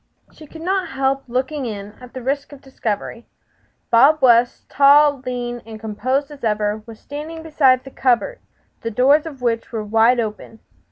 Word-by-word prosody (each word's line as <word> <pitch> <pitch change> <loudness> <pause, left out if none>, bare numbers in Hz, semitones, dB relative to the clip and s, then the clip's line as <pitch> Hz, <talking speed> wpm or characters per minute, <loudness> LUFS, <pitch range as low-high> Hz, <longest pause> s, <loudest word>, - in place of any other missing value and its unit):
She 310 - -15
could 320 +2 -11
not 375 0 0
help 270 -2 -1
looking 260 +3 -2
in, 205 -2 -6
at 250 0 -13
the 255 - -6
risk 280 +3 -2
of 285 - -12
discovery. 230 -3 -5 0.6
Bob 275 +7 +6
West 245 -2 +3
tall, 285 0 +5
lean 245 -1 -4
and 220 -1 -10
composed 255 +7 -2
as 290 -3 -13
ever 210 -1 0
was 225 -1 -11
standing 310 +3 -8
beside 270 -5 +3
the 270 - -11
cupboard, 260 - 0 0.4
the 230 - -3
doors 275 +8 +3
of 275 -5 -10
which 230 0 -1
were 225 -2 -3
wide 225 +3 +3
open. 220 0 -5
255 Hz, 170 wpm, -20 LUFS, 230-285 Hz, 0.6 s, Bob